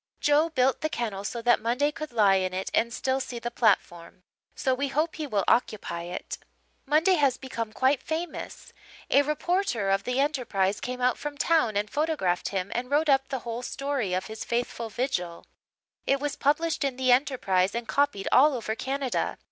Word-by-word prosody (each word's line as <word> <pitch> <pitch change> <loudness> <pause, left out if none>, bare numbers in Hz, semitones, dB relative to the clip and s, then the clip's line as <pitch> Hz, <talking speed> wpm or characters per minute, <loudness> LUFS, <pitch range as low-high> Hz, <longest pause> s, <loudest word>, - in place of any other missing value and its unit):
Joe 295 +3 +3
built 265 -4 +1
the 310 - 0
kennel 215 -8 -3
so 230 +3 -4
that 240 -1 +4
Monday 250 +6 +1
could 310 -1 -7
lie 205 -4 +4
in 185 -1 -1
it 190 - -3
and 235 +1 +2
still 260 +2 -1
see 250 -2 -5
the 235 0 -4
platform, 185 -6 0 0.3
so 260 - +1
we 280 +2 -1
hope 310 +4 -1
he 310 -2 -3
will 205 -6 0
occupy 170 -7 0
it. 175 +1 -6 0.5
"Monday 315 +6 +4
has 275 -4 +2
become 230 -4 -5
quite 260 +4 +2
famous. 325 +2 -5 0.4
A 280 - +6
reporter 300 - 0
of 195 0 +1
the 250 +3 -1
Enterprise 235 -9 0
came 250 0 -5
out 250 -1 +2
from 295 -1 -5
town 285 -11 +2
and 205 +1 0
photographed 290 - -1
him 195 0 -3
and 250 +1 -3
wrote 300 +2 +2
up 270 -1 +3
the 265 -3 -4
whole 235 +1 -4
story 265 -7 -2
of 185 - -2
his 220 0 -6
faithful 235 -1 -2
vigil. 220 -8 -3 0.6
It 275 - +2
was 290 0 -2
published 320 +2 +1
in 275 -2 -1
the 255 0 +2
Enterprise 240 -8 +2
and 235 -1 -3
copied 280 -9 0
all 285 +2 +6
over 220 -2 -3
Canada. 265 +2 -2
250 Hz, 190 wpm, -27 LUFS, 215-285 Hz, 0.6 s, A